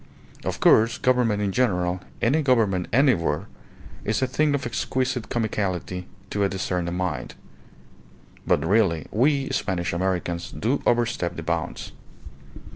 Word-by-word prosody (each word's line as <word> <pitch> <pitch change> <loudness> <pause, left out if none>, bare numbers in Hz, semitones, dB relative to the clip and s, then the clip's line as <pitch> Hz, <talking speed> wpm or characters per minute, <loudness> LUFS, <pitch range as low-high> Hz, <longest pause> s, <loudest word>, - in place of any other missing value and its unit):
Of - - -3
course, 115 +3 +5
government 120 -5 +2
in 100 - 0
general, 90 -6 +1 0.2
any 140 +7 +3
government 110 - +2
anywhere, 125 - +2 0.6
is 110 +5 0
a - - +4
thing 145 +3 +1
of 135 - -3
exquisite 125 0 -2
comicality 95 -5 -2 0.3
to 100 - 0
a 100 - +2
discerning 90 -2 -2
mind; 90 -4 -3 1.1
but - - +2
really 95 -5 +2
we 135 +4 +2
Spanish 95 -10 -1
Americans 85 -1 -1
do 125 +6 -1
overstep 120 -7 +1
the - - -6
bounds. - - -3
105 Hz, 125 wpm, -24 LUFS, 90-125 Hz, 1.1 s, course